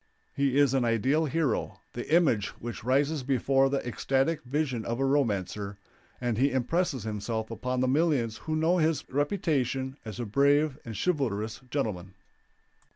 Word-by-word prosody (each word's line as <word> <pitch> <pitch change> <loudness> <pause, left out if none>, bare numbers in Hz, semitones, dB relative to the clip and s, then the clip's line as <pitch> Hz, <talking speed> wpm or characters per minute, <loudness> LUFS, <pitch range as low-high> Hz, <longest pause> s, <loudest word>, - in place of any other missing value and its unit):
He 140 -1 +1
is 140 -2 +4
an 135 -2 +2
ideal 130 +7 +2
hero, 150 -5 -1
the 120 +4 -6
image 145 - +4
which 120 -1 -6
rises 140 +4 +1
before 135 +1 +2
the 135 -2 -2
ecstatic 135 +6 0
vision 130 -3 -1
of 115 +2 -3
a 135 - +2
romancer, 105 -7 0 0.4
and 120 -3 -1
he 140 +2 +4
impresses 130 - 0
himself 110 +1 -3
upon 125 +3 -2
the 130 - +2
millions 135 -6 +1
who 155 - -3
know 165 +3 +2
his 155 -2 +1
reputation 135 - 0
as 110 0 -7
a 120 - -2
brave 140 +5 +2
and 115 -3 -7
chivalrous 115 - -1
gentleman. 100 -9 -3
130 Hz, 155 wpm, -28 LUFS, 115-145 Hz, 0.4 s, is